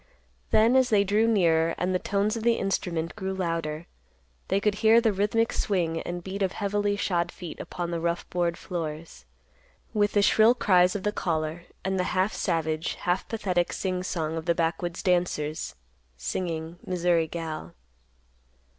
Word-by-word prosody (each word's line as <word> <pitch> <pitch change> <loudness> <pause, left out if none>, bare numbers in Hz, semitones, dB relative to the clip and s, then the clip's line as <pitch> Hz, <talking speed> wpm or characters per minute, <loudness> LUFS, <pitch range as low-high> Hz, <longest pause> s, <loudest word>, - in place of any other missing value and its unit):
Then 225 +4 +4
as 260 -1 +4
they 205 -2 +4
drew 210 +3 +2
nearer 165 -6 +3
and 180 +1 0
the 185 - +1
tones 205 +3 0
of 225 - -3
the 235 +1 +3
instrument 175 -4 -2
grew 190 -2 -3
louder, 165 -3 -2 0.6
they 195 - +2
could 210 +1 +1
hear 225 +1 +7
the 225 -3 +2
rhythmic 210 +4 +1
swing 170 -5 0
and 175 0 -5
beat 195 +2 -5
of 190 -1 +1
heavily 205 0 0
shod 175 -4 0
feet 175 -3 -8
upon 175 -1 -4
the 170 - -1
rough 170 +1 -2
board 175 -1 0
floors, 160 - -6 0.7
with 205 -1 +2
the 205 - +4
shrill 220 +4 +5
cries 180 -6 +4
of 200 - -3
the 210 - +1
caller, 160 -2 -2 0.2
and 190 0 0
the 180 - +1
half 190 +3 +2
savage, 160 -2 -1
half 180 +2 -1
pathetic 185 -6 0
sing 185 -1 -2
song 165 -3 -2
of 160 - -5
the 170 - +2
backwoods 170 +1 -1
dancers, 175 -4 0 0.4
singing, 165 - -4
"Missouri 175 -2 +1
Gal." 160 -1 -6
180 Hz, 165 wpm, -27 LUFS, 165-200 Hz, 0.7 s, hear